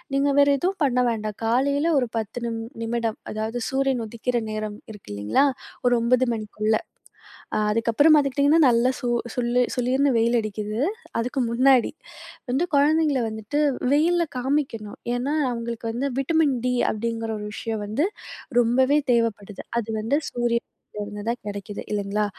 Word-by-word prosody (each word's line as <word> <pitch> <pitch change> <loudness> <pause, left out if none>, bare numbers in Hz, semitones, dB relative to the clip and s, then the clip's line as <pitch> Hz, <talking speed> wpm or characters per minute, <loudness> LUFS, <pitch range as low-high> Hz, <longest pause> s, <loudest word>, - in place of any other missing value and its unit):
நீங்க 280 +1 +2
வேற 285 - +6
எதுவும் 375 +4 -1
பண்ண 250 -2 +1
வேண்டாம். 215 -2 -4
காலையில 280 +7 +2
ஒரு 245 -3 -1
10 220 +2 -4
நிம் 225 -1 -3 0.2
நிமிடம். 230 -1 -2
அதாவது 220 +3 -3
சூரியன் 265 -3 0
உதிக்கிற 240 +2 -2
நேரம் 215 -1 -4
இருக்கு 205 - -11
இல்லீங்களா? 105 - +2 0.4
ஒரு 245 - +4
9 250 +2 +3
மணிக்குள்ள. 215 0 -1 0.8
அ - - +2 0.3
அதுக்கப்புறம் 290 +8 +5
பாத்துக்கிட்டீங்கன்னா, 285 +3 +3
நல்ல 235 +1 +3
சூ 245 - -2 0.3
சுல்லு 245 0 +1 0.2
சுளீர்ன்னு 260 +3 +2
வெயில் 235 +1 +3
அடிக்குது. 215 0 -4 0.4
அதுக்கு 250 +4 -1
முன்னாடி. 255 0 +4 0.6
வந்து 270 +7 +1
குழந்தைங்கள 295 -1 +3
வந்துட்டு 220 +7 -3 0.3
வெயில்ல 340 +4 +3
காமிக்கணும். 250 -5 -2 0.2
ஏன்னா, 270 +5 -1 0.2
அவுங்களுக்கு 235 -1 -4
"வந்து 255 +5 -2
விட்டமின் 285 0 +2
டி" 250 - +1 0.2
அப்டிங்கிற 225 +1 -3
ஒரு 210 - -6
விஷயம் 220 0 -4
வந்து 215 +9 0 0.6
ரொம்பவே 260 +5 +3
தேவப்படுது. 220 -4 0 0.2
அது 225 - -5
வந்து 230 +6 0
சூரியனிலிருந்து 210 -3 -4
தான் 240 - -2
கெடைக்குது, 205 0 -6
இல்லைங்களா? 205 +1 0
235 Hz, 140 wpm, -24 LUFS, 220-275 Hz, 0.8 s, வேற